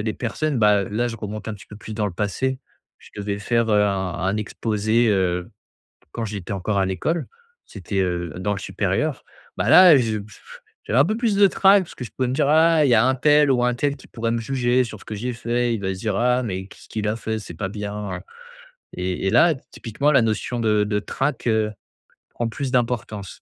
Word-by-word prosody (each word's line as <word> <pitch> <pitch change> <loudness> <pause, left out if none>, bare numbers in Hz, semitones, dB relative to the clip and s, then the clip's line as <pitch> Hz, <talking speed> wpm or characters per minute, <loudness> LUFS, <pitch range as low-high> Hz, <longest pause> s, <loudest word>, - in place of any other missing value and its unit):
les 110 -1 -1
personnes 135 +3 -2
bah 105 -2 +4
là 120 +5 -1
je 115 - -6
remonte 105 0 -6
un 110 - -3
petit 100 - -14
peu 105 - -11
plus 110 +1 -8
dans 105 - -1
le 100 - -4
passé. 120 +8 -2 0.4
Je - - -17
devais 100 0 -3
faire, 115 +1 0
heu, 105 0 +4
un 95 -3 -1
un 95 +3 0
exposé, 110 +1 0
heu, 90 -3 0 0.6
quand 115 - -4
j'étais 100 -2 -5
encore 100 +1 -1
à 95 - +2
l'école. 155 - -2 0.4
C'était, 100 -1 -4
heu, 90 -2 -1
dans 100 +2 -1
le 100 - -5
supérieur. - - -2 0.3
Bah - - 0
là 180 -5 +9
je 130 - +3
j 115 - -1
j 110 - -15 0.5
j'avais 115 - +1
un 135 - +6
peu 215 - -1
plus 230 -3 +1
de 200 0 +7
trac 195 0 +4
parce - - -13
que 125 - -7
je 115 - -9
pouvais 130 -1 -2
me 130 - -1
dire: 140 - +2
«Ah 160 0 +5
il 135 - +3
y - - +6
a 110 +3 +4
untel 145 +2 +4
ou 125 -1 +2
untel 140 +4 0
qui - - -16
pourrait 115 0 -2
me 115 - -1
juger 125 0 +1
sur 110 -3 -9
ce - - -15
que 110 - -5
j'ai 125 +4 -3
fait, 120 +1 -1
il 110 - -4
va 95 -1 -2
se 95 - -10
dire 105 -3 -1
"Ah 125 +3 +2
mais 95 -5 -4
qu'est-ce - - -16
qu'il 105 -1 -2
a 110 - -1
fait, 110 -1 -3
c'est 105 -5 -9
pas 95 +4 -4
bien", 105 -2 -5
heu» - - -11 0.7
et 90 +1 -2
et - - +3
là 155 +8 +5 0.2
typiquement 140 +7 -1
la 125 - +6
notion 115 +2 -1
de 105 -2 +2
de 105 0 0
trac, 135 +5 -3
heu, 110 -2 +1 0.6
prend 120 -1 -3
plus 130 +3 -4
d'importance. 115 -6 -2
110 Hz, 235 wpm, -22 LUFS, 100-125 Hz, 0.7 s, là